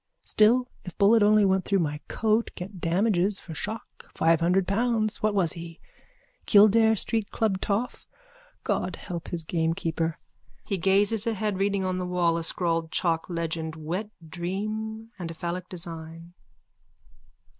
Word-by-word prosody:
Still 240 +4 +3 0.2
if 180 -3 -9
bullet 215 +3 +5
only 210 0 +5
went 190 -1 +2
through 200 - +1
my 150 -4 -1
coat 220 +1 +1
get 185 0 -8
damages 190 +2 +2
for 165 - -9
shock, 215 +7 -7
five 165 0 +3
hundred 180 +2 +2
pounds. 220 +1 0
What 215 -1 +1
was 175 -5 +2
he? 165 -1 -9 0.7
Kildare 220 +2 +6
street 220 0 -2
club 205 -4 0
toff. 215 +5 -2 0.6
God - - -1
help 175 -4 -7
his 170 -2 -4
gamekeeper. 165 0 -1 0.5
(He 195 - -2
gazes 200 +4 +2
ahead, 215 -3 -1
reading 195 -1 +1
on 185 0 -1
the 180 - -3
wall 175 -2 +1
a 165 - -3
scrawled 165 -1 0
chalk 165 0 0
legend 165 -2 -3
Wet 175 +7 -4 0.2
Dream 215 +6 -4
_and 170 -2 -4
a 165 - -7
phallic 175 +2 -4
design. 165 -1 -8
185 Hz, 145 wpm, -26 LUFS, 170-210 Hz, 0.7 s, Kildare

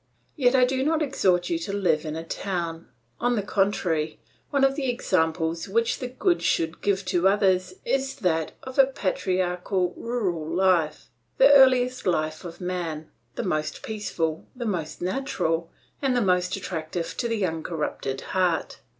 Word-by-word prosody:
"Yet 255 -3 +3
I 255 -1 +6
do 260 +1 0
not 315 +2 +2
exhort 185 -11 +1
you 165 - +1
to 170 +4 -4
live 175 -6 +1
in 155 0 -3
a 165 - -4
town; 170 -2 -4 0.3
on 245 +1 +1
the 205 - -1
contrary, 180 -6 0 0.3
one 280 -1 +1
of 270 0 +5
the 270 -3 -1
examples 165 -6 0
which 230 +3 +1
the 255 - -3
good 340 +8 +1
should 165 0 0
give 195 -1 0
to 185 0 +2
others 185 -2 +2
is 270 +2 0
that 165 - 0
of 260 +1 -6
a 270 - +8
patriarchal, 185 -5 -1
rural 205 -9 -2
life, 170 -3 +1 0.3
the 275 +2 +7
earliest 255 -3 +5
life 155 -3 0
of 170 -1 -8
man, 175 -4 -4 0.2
the - - -2
most 155 -6 -2
peaceful, 170 -7 -3
the 245 -1 -5
most 175 -6 -3
natural, 175 - -1 0.3
and 265 -3 +2
the - - +3
most 180 -2 +2
attractive 170 -3 -4
to 240 - 0
the 225 -4 0
uncorrupted 160 -5 -3
heart. 180 -3 0
185 Hz, 160 wpm, -25 LUFS, 165-245 Hz, 0.3 s, a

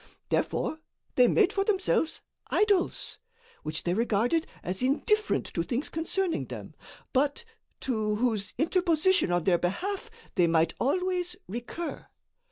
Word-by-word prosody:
Therefore 315 - 0 0.3
they 250 -1 +6
made 405 - +4
for 390 - +2
themselves 380 -5 +1 0.3
idols, 405 -4 +1 0.4
which 155 0 -2
they 175 - +1
regarded 235 - +1 0.2
as 185 +4 -3
indifferent 425 - +2
to 170 - 0
things 240 - -2
concerning 335 +2 -1
them, - - -8 0.4
but 285 - +1 0.4
to 215 -4 0
whose 215 -4 -1
interposition 340 - +3
in 175 -1 +2
their 175 -1 +3
behalf, 390 - -2 0.2
they 175 -3 +4
might 165 0 +3
always 360 +4 0
recur. 240 - -5
290 Hz, 125 wpm, -28 LUFS, -, 0.4 s, they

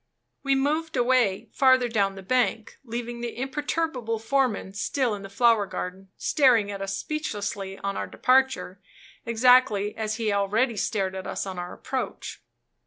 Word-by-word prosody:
We 275 -1 +2
moved 305 +3 0
away, 245 -6 +2
further 260 -2 +4
down 200 -4 0
the 195 - -9
bank, 230 0 0
leaving 240 0 -5
the 240 -1 -5
imperturbable 270 -3 -2
foreman 225 -4 0
still 240 +3 0
in 205 - -5
the 195 - -9
flower 225 0 +3
garden, 190 +1 -6
staring 245 -9 +3
at 200 -1 -6
us 195 0 -3
speechlessly 205 -10 -4
on 200 0 -2
our - - -3
departure, 255 -7 +1 0.5
exactly 230 -3 +4
as 215 -1 -2
he 225 -1 -1
had 200 - +1
already 220 +5 +1
stared 195 -1 -1
at 190 -1 -6
us - - -3
on 190 -2 -5
our 175 0 -5
approach. 260 -1 -5
225 Hz, 160 wpm, -26 LUFS, 200-260 Hz, 0.5 s, further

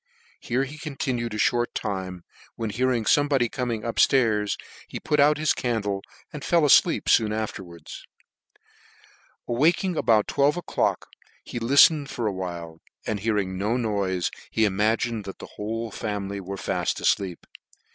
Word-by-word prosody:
Here 125 +3 -1
he 145 +3 -8
continued 130 -7 -3
a - - -3
(hort 120 +3 +1
time, 95 -3 -4 0.3
when 115 -2 -3
hearing 125 +1 +1
fomebody 140 -4 +3
coming 120 -4 -3
up 115 - -4
ftairs, 110 -6 +3 0.3
he - - -6
put 150 - 0
out 150 +1 +5
his 155 0 +2
candle, 105 -5 -2 0.3
and 150 - -7
fell 170 -2 +3
afleep 165 +4 +4
foon 110 -2 +4
afterwards. 95 -6 -6 1.4
Awaking 165 - +2
about 110 -2 +3
twelve 145 +4 +2
o'clock 175 - -1 0.4
he 120 - -6
liflened 140 +4 +5
for 120 - -3
awhile, 85 -5 -5 0.2
and 105 -2 -2
hearing 100 -3 -1
no 105 +5 0
noife, 100 -6 -1 0.2
he 110 - +2
imagined 110 +2 0
that 95 - -7
the - - -9
whole 110 +2 -4
family 100 -1 -4
were 100 +1 -6
faft - - -2
afleep. 95 -4 0
110 Hz, 145 wpm, -25 LUFS, 100-130 Hz, 1.4 s, out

